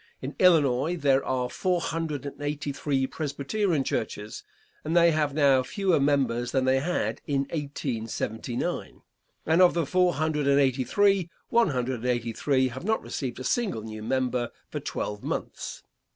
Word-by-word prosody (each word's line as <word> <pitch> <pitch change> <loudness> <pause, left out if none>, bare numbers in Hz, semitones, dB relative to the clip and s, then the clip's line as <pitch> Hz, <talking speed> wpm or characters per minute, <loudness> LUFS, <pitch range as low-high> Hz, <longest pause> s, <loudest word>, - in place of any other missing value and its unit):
In 135 +3 -6
Illinois 160 -2 +4
there 140 -3 +3
are 125 -1 -1
four 180 +7 0
hundred 160 -4 -3
and 140 0 -7
eighty 145 0 -2
three 135 -1 0
Presbyterian 155 +4 -1
Churches, 105 -4 -4 0.4
and 165 +3 0
they 170 0 +6
have 150 -3 0
now 140 -3 +5
fewer 185 +5 +1
members 130 -4 +1
than 130 -1 +2
they 130 0 +3
had 175 +6 -1
in 140 -2 +1
1879, 120 -5 -3 0.4
and 160 +3 +4
of 180 -2 +6
the 170 -2 +1
four 180 +3 +2
hundred 150 -1 0
and 140 0 +5
eighty 130 -2 +2
three, 195 - +2 0.2
one 235 -1 +4
hundred 125 -2 -1
and 125 - -4
eighty 120 -2 -1
three 130 +1 +1
have 130 +4 -8
not 220 +3 0
received 130 -4 -4
a - - -5
single 135 - -1
new 110 -1 -7
member 125 +1 0 0.2
for - - -3
twelve 105 0 -4
months. - - -5
140 Hz, 165 wpm, -27 LUFS, 125-165 Hz, 0.4 s, they